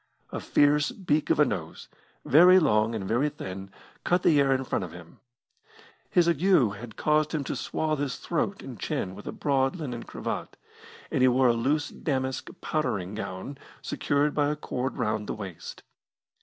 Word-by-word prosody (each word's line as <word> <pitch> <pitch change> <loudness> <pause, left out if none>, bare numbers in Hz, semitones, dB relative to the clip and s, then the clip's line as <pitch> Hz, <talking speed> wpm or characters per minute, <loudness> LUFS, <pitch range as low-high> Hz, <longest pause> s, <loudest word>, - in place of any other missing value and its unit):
A - - -3
fierce 150 +1 +3
beak 155 -6 -1
of - - +2
a 150 - +7
nose, 85 - -5 0.4
very 180 +5 +7
long 115 -9 +3
and 95 -3 -4
very 125 +8 +2
thin, 95 -9 -7 0.3
cut 180 +1 +1
the 150 -3 +5
air 135 -1 +2
in 135 0 +1
front 125 - -2
of 90 - -7
him. 85 -1 -13 0.9
His 175 -1 +3
ague 165 -3 +1 0.3
had 110 +1 -9
caused 150 +2 +1
him 150 - -1
to - - -3
swathe 155 -2 -2
his 140 -3 -2
throat - - -2
and - - -9
chin 95 - -2
with 105 +2 -11
a - - -2
broad 135 0 0
linen 130 -9 -5
cravat, - - -5 0.5
and - - +1
he 130 - +6
wore 130 0 +4
a - - +4
loose 140 +6 0
damask 130 -3 -3
powdering 100 - -2
gown 100 +6 -6 0.2
secured 145 +1 0
by 145 -1 +2
a 150 - -1
cord 130 -3 -4
round 105 -1 -1
the - - -3
waist. 95 -6 -8
135 Hz, 180 wpm, -27 LUFS, 110-150 Hz, 0.9 s, a